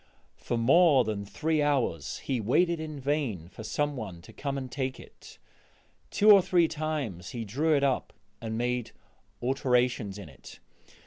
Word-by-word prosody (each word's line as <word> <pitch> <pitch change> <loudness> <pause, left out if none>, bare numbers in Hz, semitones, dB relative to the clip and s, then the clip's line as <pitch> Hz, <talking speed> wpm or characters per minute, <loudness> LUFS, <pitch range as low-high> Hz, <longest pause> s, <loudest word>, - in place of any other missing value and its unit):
For 120 - -3
more 140 +3 +5
than 105 -2 -3
three 155 +8 -1
hours 130 - 0
he 130 -4 -1
waited 170 - +2
in 155 -2 -6
vain 130 - -2
for 110 - -10
some 145 +5 -1
one 100 -9 -6
to - - -14
come 140 -1 -3
and 130 -2 -6
take 130 -2 -3
it; - - -14 0.7
two 210 +1 +5
or 200 -2 +9
three 175 -2 +3
times 145 - -4
he 115 - -3
drew 145 +9 +1
it 140 - 0
up 135 -2 0 0.3
and 110 -1 -4
made 125 0 -2 0.5
alterations 125 -5 +1
in 100 -5 -9
it. 65 -4 -14
130 Hz, 165 wpm, -28 LUFS, 110-150 Hz, 0.7 s, or